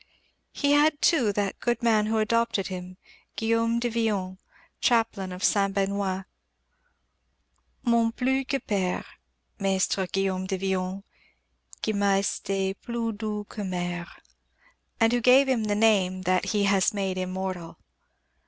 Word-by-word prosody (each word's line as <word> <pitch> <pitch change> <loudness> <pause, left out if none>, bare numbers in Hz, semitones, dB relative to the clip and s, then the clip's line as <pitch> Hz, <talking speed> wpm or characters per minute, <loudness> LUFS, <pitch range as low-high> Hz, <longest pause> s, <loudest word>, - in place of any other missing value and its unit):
He 285 -1 0
had, 295 +1 +4
too, 265 -13 +3
that 200 -1 -2
good 240 -1 -1
man 215 -2 +3
who 220 +1 0
adopted 225 -2 +1
him, 185 0 -7 0.4
Guillaume 230 +1 +1
de 240 - 0
Villon, 210 -5 -1 0.4
chaplain 225 -6 +1
of 180 +1 -7
Saint 195 -1 +2
Benoist 195 -1 -1 1.6
mon 235 -2 +3
plus 265 +3 0
que 275 - 0
père 195 -6 -2 0.5
Maistre 195 -1 +1
Guillaume 190 0 -1
de 190 0 -1
Villon, 190 0 -2 0.8
Qui 220 - 0
m'a 200 -1 +2
esté 195 0 -1
plus 235 -1 -3
doux 210 0 -4
que 215 - -7
mère; 175 -2 -3 0.9
and 225 0 +4
who 245 - +1
gave 260 +3 +6
him 245 -5 +1
the 205 -1 0
name 195 -4 +2
that 185 0 +1
he 210 -2 0
has 200 +2 +2
made 190 -2 -1
immortal. 185 -2 -4
200 Hz, 135 wpm, -26 LUFS, 190-230 Hz, 1.6 s, gave